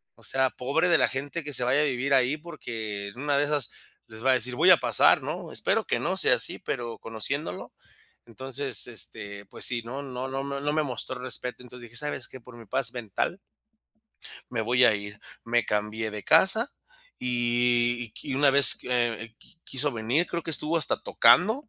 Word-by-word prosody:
O - - -22
sea, 130 -1 0
pobre 145 +8 0
de 170 - +5
la - - +4
gente 145 +5 -5
que 150 0 -5
se 125 - -1
vaya 130 +4 +2
a - - +2
vivir 135 0 -1
ahí, 130 +3 +3
porque, 110 -11 -6
en 120 - -13
una 145 -1 +1
de 145 - +2
esas, 145 -5 -1 0.4
les 110 +1 -11
va 135 - +5
a - - +5
decir: 125 +1 -3
"Voy 175 +8 +4
a 175 - +8
pasar", 125 -4 +3
¿no? - - -5
Espero - - 0
que - - -1
no - - 0
sea - - +6
así, - - 0
pero 120 -1 -5
conociéndolo. 115 -2 -2 0.5
Entonces, 130 +3 -1
este, 105 -3 -5
pues - - -2
sí, 120 -2 +3
¿no?, 135 +4 -6
no 130 -1 -5
no 135 +1 -3
me 140 0 -5
no 145 +1 -1
me 155 0 +1
mostró 130 -1 -4
respeto. 125 0 -3
Entonces 125 -1 -12
dije: 115 - -6
"¿Sabes 145 -3 -3
qué? 130 - -11
Por 120 0 -14
mi 115 - -12
paz 130 +1 -1
mental" 120 - -3 1.1
"me 115 -2 -2
voy 125 +3 +3
a 110 - +5
ir". 105 0 -7 0.2
Me 120 0 +1
cambié 105 +1 -2
de 105 -1 -7
casa 190 - +4 0.5
y 120 0 +1
y 110 - -15
qui 145 - -9
y - - -1
una 140 0 +4
vez, 140 0 +7
eh, 115 -3 -1
qui 165 - -19
quiso 140 +2 -1
venir, 120 +9 0
creo 170 -1 -3
que 165 - -5
estuvo 155 +2 +3
hasta 160 - +3
tocando 220 +10 +3
125 Hz, 210 wpm, -26 LUFS, 115-145 Hz, 1.1 s, a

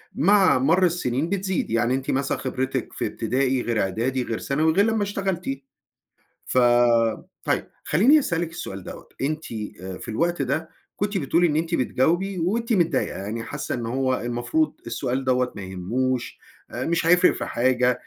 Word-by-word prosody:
مع 190 -6 +4
مَر 165 +8 +4
السِنين 160 -3 0
بتزيد، 190 -2 -1
يعني 115 +2 +1
أنتِ 135 0 -2
مثلًا 135 +1 0
خبرتِك 130 0 -3
في - - -2
ابتدائي 130 +3 0
غير 115 -2 0
إعدادي 120 +7 -1
غير 115 - -3
ثانوي 155 +3 +1
غير 200 +4 +4
لمّا 220 -2 +1
اشتغلتِ، 185 -8 -2 0.9
ف - - -2 0.9
طيب، - - 0 0.2
خلّيني 245 - +5
أسألِك 170 - -1
السؤال 95 - -7
دوّة، - - -10
أنتِ 155 +3 -2 0.6
في - - -10
الوقت 170 +8 0
ده 145 +5 -1 0.3
كنتِ 205 0 -1
بتقولِي 170 +3 +2
إن 150 - -1
أنتِ 165 +2 0
بتجاوبي 175 +9 +1
وأنتِ 230 +7 0
متضايقة، 175 -4 +1
يعني 110 +4 -4
حاسّة 140 +4 -4
إن 120 -2 -4
هو 130 +2 0
المفروض 120 - 0
السؤال 125 +3 -2
دوّة 125 -1 +1
ما 100 - -6
يهموش، 120 +8 -2 0.3
مش 165 0 -1
هيفرِق 180 +2 +6
في - - -4
حاجة، 125 +1 +2
140 Hz, 155 wpm, -24 LUFS, 125-175 Hz, 0.9 s, هيفرِق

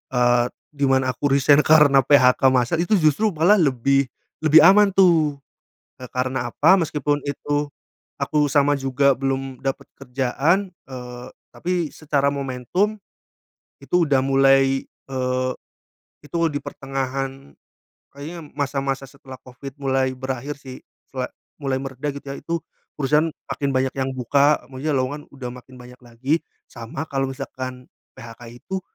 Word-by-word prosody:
eee, 120 -1 +3 0.3
di 140 -2 0
mana 130 -1 +2
aku 135 +4 -2
resign 140 +1 +5
karena 150 -3 +6
PHK 130 -1 +5
massal 130 +4 +2
itu 175 +5 +2
justru 155 +4 +3
malah 180 +7 +4
lebih 140 -2 +2 0.3
lebih 155 0 +6
aman, 195 +2 +6
tuh. 165 -6 +4 0.7
Eee, 125 - -8
karena 125 -1 -2
apa? 165 +10 +5
Meski 155 -2 -3
pun 145 +1 0
itu 145 +1 -2 0.5
aku 150 -1 +1
sama 145 0 +3
juga 135 +1 +2
belum 135 -1 -3
dapat 135 -1 -3
kerjaan, 135 +9 0 0.2
eee, 125 -1 -8 0.3
tapi 175 -3 -2
secara 145 -2 0
momentum 140 - -1 0.8
itu 180 -1 +1
udah 140 -2 +3
mulai, 135 0 +3
eee, 130 -1 -3 0.7
itu 150 - -6 0.2
di 145 - -3
pertengahan 135 - -5 0.6
kayaknya 155 +4 -8
masa-masa 135 -1 -2
setelah 135 -1 -12
covid 130 +2 -10
mulai 135 -1 +1
berakhir, 130 +2 -5
sih, 130 -2 -10 0.3
sela - - -3 0.3
mulai 135 -2 -1
mereda, 135 +2 -4
gitu, 140 0 -10
ya, 140 - -5
itu 170 0 -2 0.4
perusahaan 150 +3 +2 0.2
makin 140 -1 -2
banyak 130 0 0
yang 135 0 -1
buka, 140 +3 +2
maksudnya 135 +3 -3
lowongan 140 +3 -3
udah 135 -3 -7
makin 125 +1 -14
banyak 125 0 -14
lagi, 120 +5 -2 0.3
sama 115 +5 -7
kalau 135 -1 -1
misalkan 130 -2 -7 0.3
PHK 115 0 -11 0.2
itu 190 0 -4
135 Hz, 140 wpm, -22 LUFS, 130-150 Hz, 0.8 s, karena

